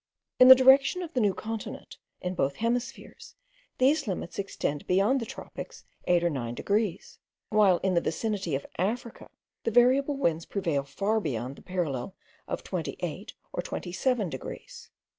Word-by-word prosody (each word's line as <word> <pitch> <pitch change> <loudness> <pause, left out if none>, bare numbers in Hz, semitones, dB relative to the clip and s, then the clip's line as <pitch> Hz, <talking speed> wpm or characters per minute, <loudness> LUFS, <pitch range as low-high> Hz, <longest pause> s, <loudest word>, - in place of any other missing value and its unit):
In 255 - +9
the 260 - +12
direction 270 +7 +5
of 335 - -8
the 255 - +1
New 205 -5 +2
Continent, 225 0 -6 0.2
in 180 0 -2
both 140 -5 0
hemispheres, 245 +3 -4 0.4
these 280 +2 +3
limits 185 -2 -4
extend 150 -7 -3
beyond 200 +9 +3
the 230 - -5
tropics - - -9 0.2
eight 175 -1 +3
or 175 - +3
nine 120 -4 -4
degrees; 205 - -2 0.3
while 205 -4 +4
in 190 -1 +2
the 170 - +3
vicinity 195 -4 -2
of 135 - -4
Africa, 225 +5 -3 0.3
the - - +1
variable 260 +5 +4
winds 165 - 0
prevail 165 -8 -1
far 205 +10 0
beyond 130 - -3
the - - -15
parallel 175 -3 -3 0.3
of - - -4
28 - - -5 0.2
or - - -1
27 210 +4 -1
degrees. 130 -6 -8
200 Hz, 155 wpm, -28 LUFS, 170-245 Hz, 0.4 s, the